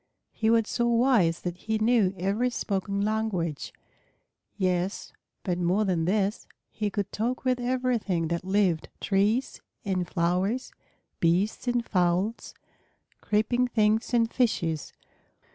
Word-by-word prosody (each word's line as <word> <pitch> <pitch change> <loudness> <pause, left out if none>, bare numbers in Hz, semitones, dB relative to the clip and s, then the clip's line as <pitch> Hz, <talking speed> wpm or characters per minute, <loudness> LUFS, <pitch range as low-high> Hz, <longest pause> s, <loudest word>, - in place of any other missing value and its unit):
He 220 - 0
was 225 -1 +3
so 240 -1 0
wise 230 -8 +3
that 175 -1 -4
he 220 +3 -2
knew 215 -4 +2
every 200 +7 0
spoken 200 -3 -2
language; 205 -7 -1 0.9
yes, 185 0 -1 0.3
but 180 -3 -1
more 180 +5 +2
than 175 -4 0
this, 200 +3 0 0.2
he 210 -2 -2
could 200 -1 -3
talk 245 +5 -2
with 255 -1 +2
everything 240 -9 0
that 170 0 -2
lived, 190 -4 +1
trees 210 +6 0 0.2
and 185 -3 -1
flowers, 180 +9 0 0.5
beasts 180 +9 +1
and 240 -1 +1
fowls, 185 +4 0 0.7
creeping 220 +4 +1
things 220 -1 +1
and 230 -2 +2
fishes. 170 - 0
205 Hz, 125 wpm, -27 LUFS, 180-230 Hz, 0.9 s, was